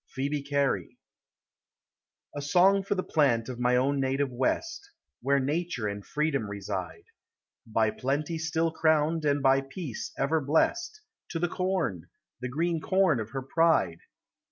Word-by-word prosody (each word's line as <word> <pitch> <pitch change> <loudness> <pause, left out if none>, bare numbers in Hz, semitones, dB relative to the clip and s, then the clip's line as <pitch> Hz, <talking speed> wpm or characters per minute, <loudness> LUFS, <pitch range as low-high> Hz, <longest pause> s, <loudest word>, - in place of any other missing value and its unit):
— - - -27
PHCEBE 140 +1 -2
CARY. 140 -2 0 1.4
A 145 - -3
song 185 +7 +4
for 195 +1 -1
the 185 - -1
plant 125 -7 +2
of 125 -1 -6
ray 125 0 +3
own 135 +2 +1
Dative 135 +1 0
West, 330 - -2 0.3
Where 140 +3 +2
nature 145 -4 -1
and 100 0 -5
freedom 145 -7 -1
reside. 95 -4 -5 0.6
By 110 -1 +2
plenty 145 +8 -2
still 160 +1 0
crowned, 160 0 +2
and 145 -1 +1
by 135 0 +5
peace 135 - -6
ever 155 +3 +1
blest, 340 - 0 0.3
To 165 - -3
the 175 +2 +1
corn! 175 - -2 0.3
the 125 0 -4
greeo 165 +4 -1
corn 185 -8 +2
of 110 -1 -4
her 135 +3 -4
pride! 135 - +2
145 Hz, 150 wpm, -28 LUFS, 125-165 Hz, 1.4 s, by